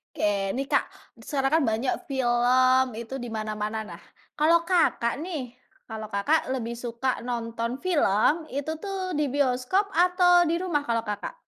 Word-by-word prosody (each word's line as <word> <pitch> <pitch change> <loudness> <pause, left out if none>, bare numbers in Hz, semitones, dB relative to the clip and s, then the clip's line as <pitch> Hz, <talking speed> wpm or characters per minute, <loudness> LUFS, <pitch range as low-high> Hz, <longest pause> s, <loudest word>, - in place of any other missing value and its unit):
Ke 200 -2 0
nih, 270 - -1
Kak, 275 - +1 0.3
sekarang 270 +5 +1
kan - - 0
banyak 250 +3 -1 0.2
film 255 0 +3
itu 235 +4 -6
dimana-mana 215 -2 -4
nah, 175 -5 -11 0.4
kalau 335 +2 +4
kakak 335 -9 +1
nih 305 -7 -5 0.4
kalau 220 -1 -5
kakak 215 +11 +1
lebih 235 -2 -4
suka 240 +2 -3
nonton 235 0 -3
film 310 - +2
itu 285 +2 -4
tuh 380 0 -4
di 300 -3 0
bioskop 280 +9 0
atau 355 0 +4
di 335 - +1
rumah 345 -5 -1
kalau, 230 -1 0
Kakak? 210 - -5
255 Hz, 145 wpm, -26 LUFS, 230-320 Hz, 0.4 s, kalau